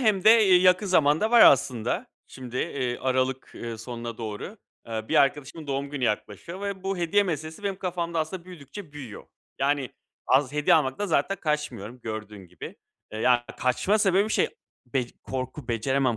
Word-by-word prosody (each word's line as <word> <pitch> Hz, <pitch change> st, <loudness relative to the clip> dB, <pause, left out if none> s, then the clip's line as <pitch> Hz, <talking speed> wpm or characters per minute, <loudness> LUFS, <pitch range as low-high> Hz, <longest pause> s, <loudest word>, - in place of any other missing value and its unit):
hem 210 Hz, -6 st, +2 dB
de 215 Hz, -, +9 dB, 0.2 s
y 180 Hz, -2 st, +6 dB
yakın 185 Hz, +3 st, +4 dB
zamanda 160 Hz, +3 st, +3 dB
var 240 Hz, -1 st, +7 dB
aslında. 130 Hz, -, +4 dB, 0.2 s
Şimdi, 125 Hz, -2 st, -8 dB
eee, 125 Hz, -2 st, -2 dB
aralık, 130 Hz, 0 st, -1 dB
ııı, 115 Hz, -1 st, -6 dB
sonuna 115 Hz, 0 st, -6 dB
doğru. 110 Hz, -, -6 dB, 0.3 s
Eee, 110 Hz, -1 st, -5 dB
bir -, -, -1 dB
arkadaşımın 145 Hz, +3 st, +1 dB
doğum 140 Hz, 0 st, -2 dB
günü 140 Hz, -3 st, -2 dB
yaklaşıyor 110 Hz, -, -3 dB
ve 200 Hz, -2 st, -4 dB
bu 195 Hz, 0 st, -2 dB
hediye 175 Hz, +4 st, +2 dB
meselesi 160 Hz, -1 st, -4 dB
benim 200 Hz, -1 st, -2 dB
kafamda 170 Hz, -3 st, -2 dB
aslında 165 Hz, +3 st, -3 dB
büyüdükçe 175 Hz, 0 st, -10 dB
büyüyor. 130 Hz, -8 st, -9 dB, 0.3 s
Yani, 140 Hz, -2 st, 0 dB, 0.4 s
az 130 Hz, +1 st, +3 dB
hediye 150 Hz, 0 st, +4 dB
almaktan 155 Hz, +5 st, +1 dB
zaten 175 Hz, +2 st, +1 dB
kaçmıyorum 130 Hz, -, -3 dB
gördüğün 105 Hz, -3 st, -7 dB
gibi. -, -, -10 dB, 0.4 s
Eee, 110 Hz, -, -5 dB
yani, 125 Hz, +1 st, +4 dB, 0.2 s
kaçma 155 Hz, +12 st, +2 dB
sebebi 200 Hz, +1 st, +3 dB
şey, -, -, +2 dB, 0.4 s
bec 125 Hz, -1 st, -2 dB
korku, 130 Hz, +1 st, -5 dB
beceremem 125 Hz, +1 st, +1 dB
140 Hz, 165 wpm, -26 LUFS, 125-180 Hz, 0.4 s, de